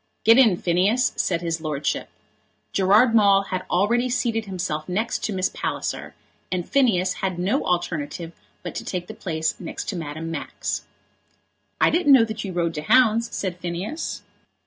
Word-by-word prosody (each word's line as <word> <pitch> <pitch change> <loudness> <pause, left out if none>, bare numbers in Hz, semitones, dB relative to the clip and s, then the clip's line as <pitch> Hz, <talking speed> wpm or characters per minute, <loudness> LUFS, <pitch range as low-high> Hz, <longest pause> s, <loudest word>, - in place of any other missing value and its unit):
"Get 230 +3 +7
in, 220 -9 +5
Phineas," 190 +9 +2
said 170 -2 0
his 165 -1 -2
lordship. 150 -2 -2 0.6
Gerard 210 +5 +4
Maule 200 -3 +5
had 185 0 -2
already 235 +7 +2
seated 230 -3 0
himself 180 -5 -4
next 215 +6 -1
to - - -2
Miss 185 -1 0
Palliser, - - -4 0.4
and 180 -2 -2
Phineas 190 -10 +2
had 185 -2 -1
no 195 +11 0
alternative 170 -2 -2 0.3
but 175 - -5
to - - -5
take 180 -2 -4
the - - -8
place 160 -2 -2
next 170 - -5
to 210 - -3
Madame 160 0 -5
Max. 160 - -4 0.9
"I - - +4
didn't 320 -5 +4
know 240 -4 +7
that 220 -1 -5
you 195 - -4
rode 170 -2 -1
to 150 - -4
hounds?" 230 +3 +4
said 180 -2 -3
Phineas. 180 - -4
185 Hz, 165 wpm, -23 LUFS, 170-225 Hz, 0.9 s, Get